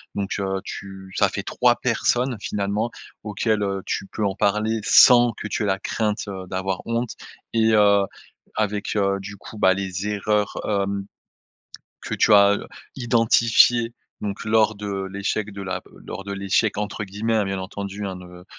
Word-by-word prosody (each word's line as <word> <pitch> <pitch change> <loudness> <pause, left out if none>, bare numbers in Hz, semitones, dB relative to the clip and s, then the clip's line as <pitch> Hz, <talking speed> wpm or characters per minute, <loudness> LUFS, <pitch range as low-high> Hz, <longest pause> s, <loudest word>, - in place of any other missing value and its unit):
donc 100 -1 -3
heu, 95 -1 -2
tu 95 -2 -8
ça - - +4
fait - - -4
3 - - +2
personnes, 125 0 0
finalement, 105 +3 -1 0.3
auxquelles, 105 0 0
heu, 100 -1 -2
tu 100 - -3
peux 105 - -3
en 100 - 0
parler 105 +3 +1
sans 120 +2 +7
que 105 - -6
tu 105 - -2
aies - - 0
la 95 -1 +1
crainte, 105 +1 -1
heu, 95 -1 -6
d'avoir 95 0 -2
honte 115 +1 -1 0.4
et 110 -1 +3
heu, 100 -2 +5 0.5
avec, 105 -1 -1
heu, 100 -1 +1
du 100 +1 -8
coup, 110 - -11
bah, 95 -1 +5
les 95 0 -3
erreurs, 105 0 0
hem, 100 -1 -1 1.0
que - - -4
tu 110 - +4
as, 100 0 +7
heu, - - -7 0.3
identifiées 115 -1 +4 0.3
donc 100 +1 -4
lors 110 0 +3
de 100 -1 -4
l'échec 100 +1 -2
de 100 - -7
la 95 -1 -3 0.2
lors 95 - -6
de 100 - -6
«l'échec» 100 +2 +1
entre 105 0 -3
guillemets, 105 +3 -2
hein, 110 - +3
bien 95 0 -2
entendu, 100 +2 -5
hein, 95 - -5
de 90 0 -12
100 Hz, 175 wpm, -23 LUFS, 95-110 Hz, 1.0 s, sans